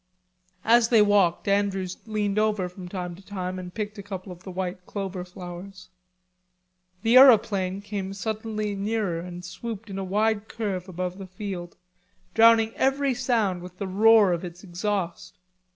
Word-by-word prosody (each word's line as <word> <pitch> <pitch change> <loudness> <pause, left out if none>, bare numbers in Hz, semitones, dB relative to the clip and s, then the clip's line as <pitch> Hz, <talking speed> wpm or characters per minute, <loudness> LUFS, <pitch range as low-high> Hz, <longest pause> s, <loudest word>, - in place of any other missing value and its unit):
As 230 0 +5
they 225 -3 +6
walked 200 -4 +3
Andrews 195 -2 0
leaned 210 -1 0
over 210 -4 +1
from 180 0 -10
time 180 -2 -4
to 180 - -13
time 185 -2 -4
and 180 -1 -7
picked 210 +1 -5
a - - -4
couple 190 -1 -7
of 175 -1 -11
the 190 - -9
white 180 0 -4
clover 195 -3 -4
flowers. 180 +1 -10 1.1
The 235 +2 +6
aeroplane 200 -7 +5
came 200 -2 -4
suddenly 215 +1 -3
nearer 200 -3 -1
and 175 +1 -8
swooped 215 +3 -7
in 195 - -4
a - - -2
wide 210 +2 0
curve 195 -4 -4
above 180 +1 -4
the 190 - -7
field, 185 -2 -6 0.6
drowning 225 0 +6
every 270 0 +2
sound 225 -8 0
in 180 - -7
the 200 - -3
roar 210 0 +5
of 170 - -3
its 175 0 -8
exhaust. 185 -1 -3
195 Hz, 160 wpm, -26 LUFS, 180-215 Hz, 1.1 s, they